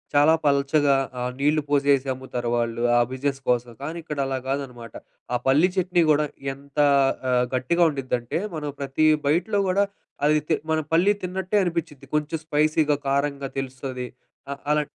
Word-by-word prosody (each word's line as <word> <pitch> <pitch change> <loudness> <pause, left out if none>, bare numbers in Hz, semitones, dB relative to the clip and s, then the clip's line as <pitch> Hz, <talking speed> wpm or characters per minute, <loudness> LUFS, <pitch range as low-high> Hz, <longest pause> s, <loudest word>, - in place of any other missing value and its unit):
చాలా 145 +2 +6
పల్చగా 140 0 +3 0.2
ఆహ్, 125 0 -2
నీళ్ళు 150 +2 +2
పోసేసి 140 -1 +2
అమ్ముతారు 125 -2 -4
వాళ్ళు 115 0 -1
ఆ - - +5
బిజినెస్ 135 +1 -2
కోసం. 120 0 -1
కానీ 160 +4 -4
ఇక్కడ 150 -2 -5
అలా 135 -1 -1
గాదనమాట. 125 -5 -4 0.4
ఆ 125 - +3
పల్లి 150 +7 +5
చట్నీ 180 -2 +2
గూడా 150 0 +2 0.3
ఎంత 140 +1 -20 0.5
ఆహ్, 125 0 +3
గట్టిగా 170 +7 +2
ఉండిద్దంటే 130 -2 -2 0.2
మనం 150 -2 -4
ప్రతి 140 +3 +1 0.2
బైట్‌లో 200 +7 +2
గూడా 200 +2 +3 0.4
అది 155 +1 +4
తి 160 - +2 0.2
మనం 160 0 +1
పల్లి 175 +5 +4
తిన్నట్టే 185 +2 -3
అనిపించుద్ది 165 -6 -3
కొంచెం 150 +2 0
స్పైసీగా, 155 -1 +2
కారంగా 140 0 0
తెలుస్తది 130 -1 -4 0.4
ఆహ్, 140 - -6
అలా. 150 0 +3
145 Hz, 150 wpm, -24 LUFS, 130-155 Hz, 0.5 s, చాలా